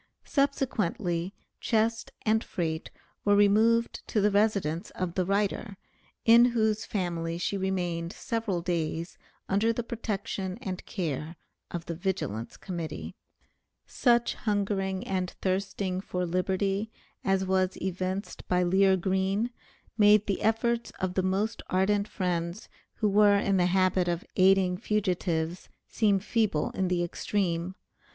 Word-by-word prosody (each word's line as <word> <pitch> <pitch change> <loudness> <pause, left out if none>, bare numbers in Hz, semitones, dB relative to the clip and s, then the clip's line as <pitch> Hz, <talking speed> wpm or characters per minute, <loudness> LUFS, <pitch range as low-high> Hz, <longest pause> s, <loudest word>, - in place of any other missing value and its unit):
Subsequently 205 - 0 0.2
chest 225 -1 0
and 220 +1 +2
freight 160 -2 -3 0.3
were 205 0 +4
removed 220 +3 +3
to 215 - 0
the 205 +1 +3
residence 200 -6 +1
of 180 -2 -2
the 185 -1 0
writer, 200 0 -1 0.5
in 235 +1 +8
whose 220 -2 +1
family 170 -4 -2
she 175 +3 -1
remained 175 -3 -2
several 225 -7 -2
days 170 -1 -2 0.3
under 205 +4 +2
the 235 +1 -2
protection 205 -4 -4
and 190 -7 -5
care 160 -3 -3 0.3
of 170 -1 -5
the 170 - -4
Vigilance 160 - -3
Committee. 170 -4 -5 0.7
Such 240 -2 +2
hungering 195 -2 -1
and 185 -2 -1
thirsting 190 0 -1
for 180 -2 -2
liberty, 195 +4 0 0.3
as 195 0 +1
was 185 0 +1
evinced 185 +2 -3
by 180 0 +2
Lear 190 +2 +4
Green, 190 +5 0 0.5
made 210 0 +6
the 200 - -1
efforts 230 +2 +1
of 185 -1 -1
the 190 - +1
most 195 +4 -1
ardent 200 +2 +2
friends, 175 0 -3 0.3
who 215 - +1
were 205 0 +5
in 200 -1 +1
the 180 -1 +3
habit 185 0 +2
of 175 +1 -1
aiding 190 -1 +4
fugitives, 180 -5 -1 0.2
seem 205 -3 +2
feeble 205 -6 0
in 190 - -1
the 175 -1 +1
extreme. 175 0 -1
190 Hz, 130 wpm, -28 LUFS, 180-210 Hz, 0.7 s, in